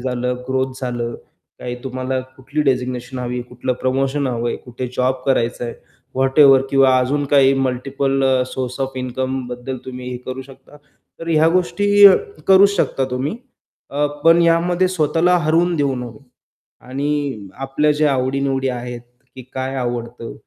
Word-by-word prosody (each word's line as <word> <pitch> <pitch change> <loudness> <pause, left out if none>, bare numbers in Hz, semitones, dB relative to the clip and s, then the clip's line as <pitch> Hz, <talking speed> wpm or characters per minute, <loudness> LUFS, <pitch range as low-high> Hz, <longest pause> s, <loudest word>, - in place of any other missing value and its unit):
झालं, 125 0 -2
ग्रोथ 130 0 0
झालं, 120 -2 -3 0.4
काही 125 0 -5
तुम्हाला 130 0 -2 0.2
कुठली 140 +3 -2
डेझिग्नेशन 125 -1 -1
हवी 125 0 -3
आहे? - - -3
कुठलं 125 +1 -3
प्रमोशन 135 +2 0
हवंय? 120 -1 -2
कुठे 125 +1 -7
जॉब 130 +1 +2
करायचं 120 -2 0
आहे, 120 - -5 0.4
व्हॅटएव्हर. 135 0 +5
किंवा 135 -1 +5
अजून 140 +3 0
काही 135 -1 +4
मल्टिपल 135 +1 -1 0.2
सोर्स 130 0 -5
ओएफ 135 0 -3
इन्कमबद्दल 130 0 -4
तुम्ही 125 -1 -7
हे 125 - -4
करू 130 +1 -5
शकता. 135 +2 -16 0.4
तर 165 - -6
ह्या 160 0 +4
गोष्टी 205 +3 +3
अ, 195 - +9 0.3
करूच 195 +1 +7
शकता 135 -5 0
तुम्ही. 130 - -2 0.5
अ, 145 +1 +1 0.2
पण 165 +1 +6
यामध्ये 175 +2 +2
स्वतःला 175 +1 +2
हरवून 170 +2 +2
देऊ 140 -2 +1
नये. 120 0 -7 0.7
आणि 140 -5 -2 0.2
आपल्या 150 +3 +1
जे 155 - +3
आवडी-निवडी 135 0 0
आहेत, 125 -1 -5 0.3
की 130 - -9
काय 130 +1 -3
आवडतं? 120 -1 -4
130 Hz, 145 wpm, -19 LUFS, 125-145 Hz, 0.7 s, अ